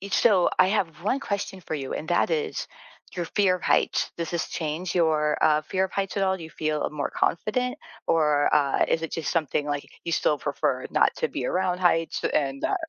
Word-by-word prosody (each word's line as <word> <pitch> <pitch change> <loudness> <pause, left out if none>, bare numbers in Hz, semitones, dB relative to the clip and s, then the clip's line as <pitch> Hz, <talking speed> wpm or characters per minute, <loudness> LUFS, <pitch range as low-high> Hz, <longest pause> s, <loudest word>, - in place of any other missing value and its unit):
e 200 - -7
so, 195 -5 +4
I 185 - +7
have 170 -6 -1
one 250 +8 0
question 200 -4 -3
for 160 - -5
you 135 -3 -4
and 155 - -5
that - - +2
is: 455 -2 -1 0.5
your 175 - -1
fear 190 0 +2
of 180 - -15
heights. - - +2
Does 170 -1 -3
this 170 -1 -2
change 165 +2 -3
your 155 -3 +2
uh, 155 0 +4
fear 190 +4 0
of 190 - -5
heights 195 0 -2
at 200 - +1
all? 190 0 +1
Do - - -9
you 160 - -10
feel 155 -1 -2
a - - -1
more 150 -1 -3
confident 250 +8 0 0.3
or 150 -3 +3
uh, 140 -2 +3
is 165 - +1
it 165 - -4
just 165 -3 -2
something 155 -3 0
like 145 -1 -2 0.2
you 170 - -2
still 150 -1 +2
prefer - - -1
not - - +3
to - - 0
be - - -4
around 180 -1 0
heights 165 -2 +2
and, 135 -2 -1
uh - - +2
170 Hz, 225 wpm, -26 LUFS, 150-190 Hz, 0.5 s, I